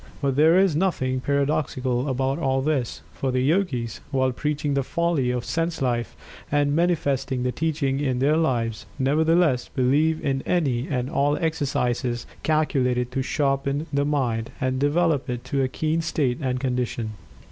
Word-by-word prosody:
But 140 -2 0
there 160 +5 +5
is 190 -5 +4
nothing 130 -7 0
paradoxical 140 -2 0
about 135 +3 0
all 135 -3 +1
this, 140 -5 -1
for 135 - -2
the 130 0 +1
Yogis, 135 -6 0
while 130 -2 +1
preaching 150 +2 -2
the 140 - +2
folly 170 -2 0
of 125 -1 -2
sense 165 +3 -1
life, 120 -4 -1 0.4
and 145 0 +2
manifesting 145 -6 0
the 125 - 0
teaching 140 -1 -1
in 130 -4 0
their 140 +4 +3
lives, 120 -9 0
nevertheless 150 0 +2
believe 150 +5 +2
in 135 -1 0
any 135 -8 0
and 125 -3 -1
all 145 +2 +1
exercises 130 -7 -1 0.2
calculated 130 -6 +1
to 135 - -1
"sharpen" 140 +2 0
the 140 0 +2
Mind, 125 -6 0
and 130 -2 0
develop 145 -1 +1
it 120 -1 -3
to 135 +2 -1
a 130 - +2
keen 155 +4 -1
state 145 -7 0
and 130 -2 -1
condition. 125 -3 -2
135 Hz, 160 wpm, -24 LUFS, 125-155 Hz, 0.4 s, there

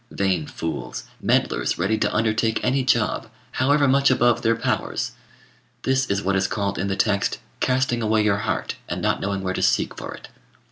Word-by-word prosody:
Vain 95 -6 0
fools! 65 -6 -5 0.2
meddlers - - +1
ready 95 +5 +1
to 110 - 0
undertake 110 0 +1
any 130 +1 +2
job, 120 -4 +1 0.2
however 140 +2 +3
much 140 +1 +4
above 120 -2 +3
their 115 0 +2
powers! 115 - -2 0.7
This 130 0 +1
is 100 +1 -1
what 95 +1 +1
is 95 0 +2
called 100 0 -2
in 100 - -1
the 95 - -1
text, 100 0 +1 0.2
"casting 125 -2 +1
away 110 0 +2
your 105 -2 +2
heart, 105 - -2
and - - -2
not - - 0
knowing 100 0 -2
where 95 0 -1
to - - -2
seek - - +2
for - - -7
it." - - -13
110 Hz, 185 wpm, -23 LUFS, 100-125 Hz, 0.7 s, much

